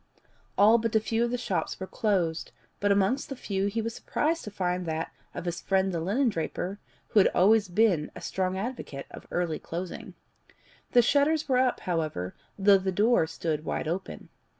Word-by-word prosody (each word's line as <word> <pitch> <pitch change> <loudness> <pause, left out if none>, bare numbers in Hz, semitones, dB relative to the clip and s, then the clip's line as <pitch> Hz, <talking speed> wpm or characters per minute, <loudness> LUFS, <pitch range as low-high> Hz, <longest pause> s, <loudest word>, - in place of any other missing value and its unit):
All 220 +3 +6
but 225 -1 -2
a - - +6
few 225 +2 0
of 240 - 0
the 245 - -1
shops 245 - -2
were 190 - -4
closed, 185 -6 -1 0.3
but 205 0 +2
amongst 200 +6 +2
the 275 - -4
few 195 -5 -2
he 220 +2 -2
was 230 +1 -3
surprised 325 +7 -1
to - - -5
find 180 -3 -2
that 160 0 -2 0.2
of - - -5
his 175 0 -3
friend 190 0 +1
the 170 - -1
linendraper, 200 - -1 0.3
who 215 - +4
had 195 - +6
always 210 +3 +5
been 180 -5 +2
a - - -7
strong 185 0 -1
advocate 195 - -5
of - - -11
early 175 -3 -1
closing. 175 +2 -6 0.8
The 245 -2 +7
shutters 290 +4 +2
were 255 -2 +3
up, 255 -1 +1
however, 155 - -2 0.2
though 195 0 +6
the 190 0 -1
door 210 -2 +3
stood 155 -2 -3
wide 155 - -3
open. 180 +4 -4
195 Hz, 185 wpm, -28 LUFS, 175-230 Hz, 0.8 s, The